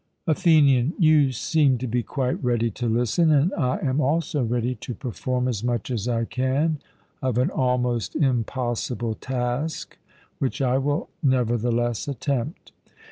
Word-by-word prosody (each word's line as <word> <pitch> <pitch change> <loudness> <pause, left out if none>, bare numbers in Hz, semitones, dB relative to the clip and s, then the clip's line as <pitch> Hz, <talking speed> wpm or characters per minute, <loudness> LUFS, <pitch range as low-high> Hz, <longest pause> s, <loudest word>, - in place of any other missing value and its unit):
ATHENIAN: 155 -4 +4
You 155 -5 +4
seem 135 +1 +2
to 125 - -4
be 120 0 0
quite 130 +1 -2
ready 120 -2 +1
to 120 +4 -3
listen; 120 +8 +2
and 150 +6 +3
I 135 -9 0
am 135 +1 +1
also 155 +1 0
ready 120 +1 0
to 120 +1 -7
perform 125 +2 -2
as 115 -4 -2
much 120 0 -1
as 115 -2 -2
I 115 -1 0
can 135 +6 0 0.4
of 130 -3 0
an 125 - +2
almost 125 -3 0
impossible 120 -3 -1
task, 130 +6 -3 0.4
which 135 +2 -1
I 130 -1 +2
will 145 +4 -1
nevertheless 120 -3 +1
attempt. 140 +1 -3
125 Hz, 140 wpm, -24 LUFS, 120-145 Hz, 0.4 s, ATHENIAN